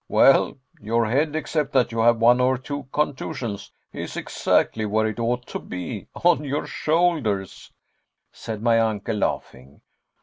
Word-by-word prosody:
"Well, - - +4 0.2
your 115 +2 +1
head, 145 +7 0
except 155 -2 -2
that 130 -3 +3
you 115 - -3
have 120 +1 +4
one 120 +2 +5
or 130 +1 +3
two 140 +2 -6
contusions, 130 -7 -3 0.2
is - - -6
exactly 110 - 0
where 110 +1 +1
it 110 +1 -3
ought 120 +1 -1
to - - -4
be 90 -2 -6
on 140 - +2
your 145 +1 -2
shoulders," 150 - -1 0.6
said 110 -1 -7
my 115 -1 +4
uncle, 110 -1 -1
laughing. 70 -8 -4
115 Hz, 145 wpm, -23 LUFS, 110-140 Hz, 0.6 s, one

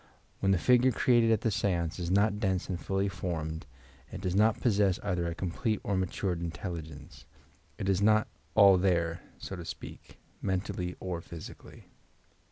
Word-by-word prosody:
When 95 - +2
the 95 - +4
figure 125 +6 +4
cre 125 - +1
ated 120 -2 +5
at 110 -2 +3
the 115 - +1
seance 85 -4 -1
is 85 -1 -3
not 105 +2 +2
dense 95 -4 0
and 90 -2 -2
fuUy 95 +1 -1
formed, 80 -5 -4 0.4
it - - -6
does 90 -1 -2
not 105 +3 +3
possess 100 -5 +2
either 85 -1 -1
a 85 - -3
complete 100 +5 -1
or 100 - -1
matured 95 -1 -1
intelligence. 80 -2 -7 0.5
It 95 - -3
is 95 0 +2
not 110 +1 +4 0.3
"all 100 -3 +7
there," 85 -3 +1 0.2
so 95 - -6
to 90 - -7
speak, - - -9 0.2
mentally 95 -2 -2
or 90 -3 -4
physically. 80 -1 -11
95 Hz, 170 wpm, -30 LUFS, 85-100 Hz, 0.5 s, all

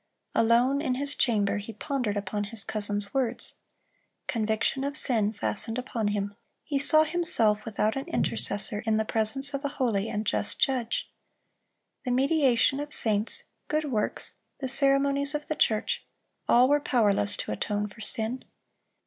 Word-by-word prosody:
Alone 245 +5 +3
in 260 -5 -1
his 280 +2 0
chamber 210 -5 +1
he 215 +2 -8
pondered 230 -2 -2
upon 205 +1 -3
his 210 0 -1
cousin's 205 -1 -2
words. 250 -3 -2 0.7
Conviction 220 +4 0
of 285 +1 0
sin 220 -8 +2
fastened 225 +2 -2
upon 240 -4 -3
him; 205 0 -2 0.3
he 280 -2 -1
saw 310 +3 +5
himself, 300 -11 +1
without 215 0 -1
an 270 - -4
intercessor, 200 - -1
in 220 -1 +2
the 220 - 0
presence 230 +7 0
of 275 +1 -3
a 285 - -1
holy 230 -7 -1
and 210 +1 -3
just 205 - -1
Judge. 260 -5 0 0.9
The 255 - -4
mediation 270 0 +2
of 295 0 -5
saints, 215 -5 +3 0.2
good 305 -2 -1
works, 215 -3 -2 0.2
the 265 - -3
ceremonies 275 +2 +3
of 295 0 -3
the 310 - -3
church, 215 -6 0 0.5
all 245 +2 +6
were 290 +1 +3
powerless 205 -6 +2
to - - -4
atone 210 0 -2
for 210 +2 -14
sin. 225 +4 0
235 Hz, 155 wpm, -27 LUFS, 210-275 Hz, 0.9 s, all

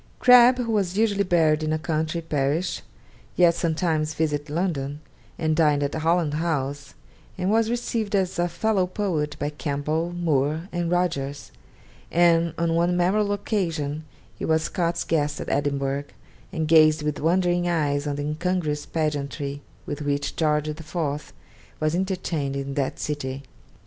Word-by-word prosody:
Crabbe, 250 0 +7
who 230 - -2
was 195 -3 0
usually 205 -2 +2
buried 160 -4 +3
in 155 0 -1
a 155 - +1
country 155 +1 -2
parish, 150 +2 -1 0.5
yet 175 -1 +5
sometimes 160 -2 0
visited 150 -2 -1
London, 150 -4 -2 0.4
and 155 -1 0
dined 150 -3 +3
at 140 - -2
Holland 160 -1 +1
House, 145 -4 -2 0.4
and 185 +2 0
was 225 0 +3
received 230 -3 -1
as 185 -2 0
a 175 - +2
fellow 185 +2 0
poet 175 -7 -2
by 145 +1 -2
Campbell, 150 +3 -2
Moore, 160 -1 0
and 175 -1 -1
Rogers; 150 -6 -1 0.6
and 170 -1 +3
on 165 -1 +1
one 175 +1 +2
memorable 200 +4 +2
occasion 165 -8 -2 0.4
he - - -5
was 160 0 +2
Scott's 170 -2 -1
guest 150 -2 0
at - - -5
Edinburgh, 140 0 -1 0.5
and 160 -4 -2
gazed 155 -1 +5
with 150 -1 -2
wondering 175 +2 +2
eyes 145 -3 0
on 145 - -1
the 145 - -3
incongruous 155 -1 -2
pageantry 145 -2 -2 0.2
with 150 -4 -5
which 145 0 -1
George 150 -1 +1
IV. 155 -1 -4 0.5
was 155 0 0
entertained 175 -6 -2
in 140 0 -3
that 135 -1 -1
city. 140 -2 -4
160 Hz, 150 wpm, -24 LUFS, 145-175 Hz, 0.6 s, Crabbe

